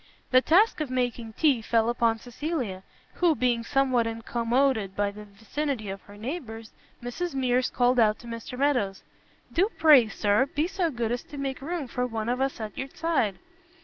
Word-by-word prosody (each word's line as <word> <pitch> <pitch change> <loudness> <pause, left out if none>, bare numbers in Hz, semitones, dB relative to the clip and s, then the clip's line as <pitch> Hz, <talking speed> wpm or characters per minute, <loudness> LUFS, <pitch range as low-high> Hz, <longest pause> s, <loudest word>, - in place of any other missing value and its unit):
The 255 0 +6
task 365 +5 +4
of 300 - -2
making 245 -3 -2
tea 275 -3 +2
fell 225 0 +2
upon 235 -1 +2
Cecilia, 245 - -4 0.3
who 345 -3 +2
being 245 -3 +1
somewhat 260 -3 +2
incommoded 230 -1 0
by 205 0 0
the 210 +1 -10
vicinity 220 +3 -4
of 195 0 -6
her 205 0 -15
neighbours, 225 -3 -6 0.3
Mrs 275 +7 -4
Mears 255 -1 +1
called 245 0 +2
out 215 -2 +4
to - - -15
Mr 230 +2 -7
Meadows 250 -9 0 0.5
"Do 380 +5 +3
pray, 295 -8 +7
Sir, 215 +4 +1
be 295 +3 -1
so 360 -1 -1
good 235 -5 -2
as 245 - -1
to 290 - -10
make 270 -1 -3
room 320 -1 -3
for 250 +1 -2
one 225 -1 -3
of 250 +2 0
us 270 -2 -1
at 215 -2 -6
your 270 - -5
side." 280 - 0
245 Hz, 180 wpm, -27 LUFS, 225-280 Hz, 0.5 s, pray